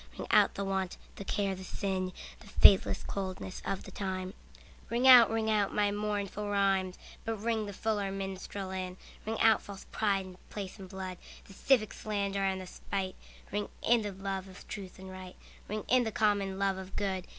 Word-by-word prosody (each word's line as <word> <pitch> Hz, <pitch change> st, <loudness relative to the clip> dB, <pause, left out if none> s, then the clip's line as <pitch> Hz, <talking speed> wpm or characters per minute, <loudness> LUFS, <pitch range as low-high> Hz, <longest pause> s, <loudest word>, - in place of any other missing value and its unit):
Ring -, -, -5 dB
out -, -, +5 dB
the 200 Hz, -, -2 dB
want, 190 Hz, -1 st, -1 dB, 0.2 s
the -, -, -5 dB
care 200 Hz, 0 st, 0 dB
the 190 Hz, 0 st, -7 dB
sin, 185 Hz, -1 st, -2 dB, 0.3 s
The 220 Hz, -, -15 dB
faithless 195 Hz, -1 st, +6 dB
coldness 190 Hz, -1 st, -4 dB
of 195 Hz, -, -2 dB
the -, -, -10 dB
times; 185 Hz, -1 st, -3 dB, 0.6 s
Ring 240 Hz, +3 st, +2 dB
out, 245 Hz, -3 st, +10 dB
ring 225 Hz, -1 st, 0 dB
out 210 Hz, -2 st, +2 dB
my 205 Hz, -1 st, +3 dB
mournful 205 Hz, 0 st, -2 dB
rhymes, 195 Hz, -2 st, +2 dB, 0.3 s
But 225 Hz, -, -1 dB
ring 220 Hz, 0 st, -1 dB
the -, -, -4 dB
fuller 205 Hz, -1 st, -1 dB
minstrel 195 Hz, 0 st, -5 dB
in. 185 Hz, -1 st, -4 dB, 0.3 s
Ring 225 Hz, 0 st, -1 dB
out 225 Hz, -1 st, +6 dB
false 200 Hz, -1 st, -9 dB
pride 200 Hz, -3 st, +1 dB
in 185 Hz, -1 st, -11 dB
place 200 Hz, 0 st, -6 dB
and 190 Hz, -1 st, -9 dB
blood, 185 Hz, -1 st, -6 dB, 0.3 s
The 195 Hz, -, -13 dB
civic 215 Hz, 0 st, +3 dB
slander 200 Hz, -2 st, -2 dB
and 190 Hz, -1 st, +1 dB
the 185 Hz, -, -6 dB
spite; 190 Hz, +1 st, -4 dB, 0.4 s
Ring 205 Hz, 0 st, -2 dB, 0.2 s
in 235 Hz, 0 st, +5 dB
the 205 Hz, -1 st, -3 dB
love 195 Hz, 0 st, -4 dB
of 190 Hz, 0 st, -13 dB
truth 195 Hz, -3 st, -7 dB
and 190 Hz, 0 st, -9 dB
right, 185 Hz, -1 st, -9 dB, 0.3 s
Ring 215 Hz, +1 st, -3 dB
in 255 Hz, 0 st, +5 dB
the 220 Hz, -, -2 dB
common 200 Hz, -3 st, +1 dB
love 195 Hz, -1 st, +1 dB
of 190 Hz, 0 st, -9 dB
good. 190 Hz, -3 st, -1 dB
195 Hz, 195 wpm, -31 LUFS, 190-210 Hz, 0.6 s, out